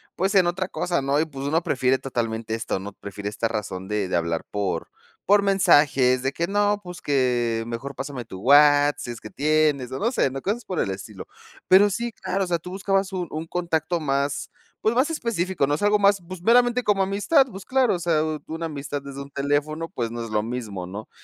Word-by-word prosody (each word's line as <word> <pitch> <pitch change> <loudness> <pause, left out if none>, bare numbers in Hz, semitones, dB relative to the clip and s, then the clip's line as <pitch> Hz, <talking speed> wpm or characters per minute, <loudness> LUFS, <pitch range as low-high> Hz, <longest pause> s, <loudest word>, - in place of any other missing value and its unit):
pues 195 +3 0
en 185 -3 +5
otra 180 +2 -1
cosa, 175 -5 -1
¿no?, 140 +2 +1
y 160 - +2
pues 140 -3 -7
uno 160 +3 +2
prefiere 130 -2 +1
totalmente 115 -3 -3
esto, 110 -3 -3
¿no?, 100 +1 -8
prefiere 100 +1 -6
esta 110 +2 -1
razón 100 -4 -4
de 105 -2 -1
de 90 - -2
hablar 85 -1 -1
por 95 -5 -2 0.4
por 205 +1 +5
mensajes 145 -10 +4
de 135 +1 0
que: 170 - -1
"No, 205 +1 +1
pues," 180 -1 -9
que 120 -5 +1
mejor: 120 +4 -6
"Pásame 135 -2 -5
tu 95 -4 -9
Whats 145 +2 +5
sí - - -6
es 115 - -8
que 110 - -10
tienes" 150 -3 +1
o 130 - -3
no 230 +3 +1
sé, 245 - +1
¿no?, 135 +1 -5
cosas 215 +4 -2
por 185 - -3
el 95 - 0
estilo, 95 +1 -8 0.4
pero 195 +3 +7
sí, 235 +4 -3
claro, 195 -1 -2
o - - -3
sea, 170 -1 0
tú 180 - -9
buscabas 195 0 0
un 180 -2 -3
un 160 +1 -5
contacto 170 0 -1
más 140 -1 -1 0.3
pues, 220 - +2
más 260 +6 +2
específico, 190 - -1
¿no?, 145 - -1
es 145 - -1
algo 205 0 +4
más, 200 -1 +3
pues, 185 -1 -8
meramente 245 +2 +4
como 205 -3 +2
amistad, 205 +9 +3
pues, 195 -3 -10
claro, 260 -5 +2
o - - -4
sea, 165 -3 +1 0.2
una 165 +1 -4
amistad 145 -1 -5
desde 140 0 -9
un 140 - -15
teléfono 145 +4 -1
pues 115 -2 -3
no 120 0 -4
es 115 - -7
lo 105 -1 0
mismo, 110 -6 -5
¿no?, 100 +4 -8
145 Hz, 225 wpm, -24 LUFS, 120-190 Hz, 0.4 s, pero